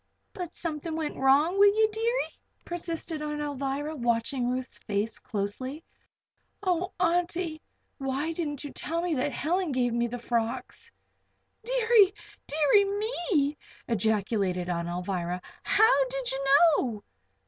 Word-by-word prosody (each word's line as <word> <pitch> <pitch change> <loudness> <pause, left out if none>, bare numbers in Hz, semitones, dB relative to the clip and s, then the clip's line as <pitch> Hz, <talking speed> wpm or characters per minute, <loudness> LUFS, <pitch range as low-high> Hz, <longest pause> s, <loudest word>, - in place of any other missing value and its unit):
"But 360 -5 -6
something 320 -1 -3
went 315 -2 -3
wrong 290 +8 +3
wi' 405 - +9
ye, 440 0 +5
deary?" 465 +3 -1 0.3
persisted 335 -2 -4
Aunt 300 0 -3
Alvirah, 290 +1 -2
watching 240 0 0
Ruth's 255 +1 -3
face 210 +1 -2
closely. 250 +8 -4 0.8
"Oh, 365 0 0
Auntie! 340 -2 0 0.4
why 275 +4 -1
didn't 300 -4 -3
you 290 - -6
tell 335 +2 -2
me 355 -2 0
that 285 0 0
Helen 340 +6 0
gave 245 -2 +1
me 235 0 +1
the 245 +1 -5
frocks?" 235 +1 -3 0.7
"Deary, 455 -5 +4 0.3
deary, 310 +7 +4
me!" 390 - 0 0.3
ejaculated 200 -4 0
Aunt 170 -1 -1
Alvirah. 180 0 -2 0.2
"How 440 +5 +4
did - - -3
you 275 +1 -3 0.3
know?" 220 -5 -3
295 Hz, 125 wpm, -28 LUFS, 240-355 Hz, 0.8 s, wi